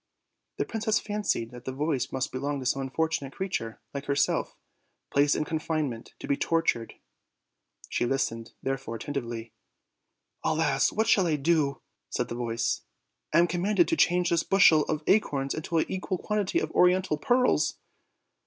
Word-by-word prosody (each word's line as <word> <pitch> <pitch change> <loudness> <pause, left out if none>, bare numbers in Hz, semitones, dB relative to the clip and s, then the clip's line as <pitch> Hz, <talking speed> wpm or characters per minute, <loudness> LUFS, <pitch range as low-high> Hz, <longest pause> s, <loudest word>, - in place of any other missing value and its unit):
The - - 0
princess 225 0 0
fancied 205 - -2
that 125 0 -11
the 130 - -3
voice 135 -2 -1
must 130 0 -2
belong 140 +2 -2
to 130 - -6
some 135 +2 +1
unfortunate 135 0 -2
creature, 115 -12 -3
like 140 0 -5
herself, 140 0 0 0.5
placed 145 +1 +3
in 155 - -1
confinement, 155 -6 -3
to - - -8
be 140 - +2
tormented; 165 -8 0 0.9
she 120 - 0
listened, 115 -4 -2
therefore, 135 -3 -3
attentively. 115 -3 -5 0.9
"Alas! - - +2
what 220 - +1
shall 195 -5 +4
I 155 - +2
do?" 145 -2 +1 0.3
said - - -2
the - - -3
voice; 115 -1 -1 0.5
"I - - +3
am 170 - +6
commanded 200 - +2
to 330 - +2
change 180 - +3
this 170 -1 +3
bushel 170 -6 +5
of 155 -1 -2
acorns 140 -10 +2
into 160 +2 -2
an 160 - +3
equal 190 0 -2
quantity 210 0 -1
of - - -1
oriental 180 -2 +3
pearls." 250 +8 +2
150 Hz, 155 wpm, -28 LUFS, 130-180 Hz, 0.9 s, am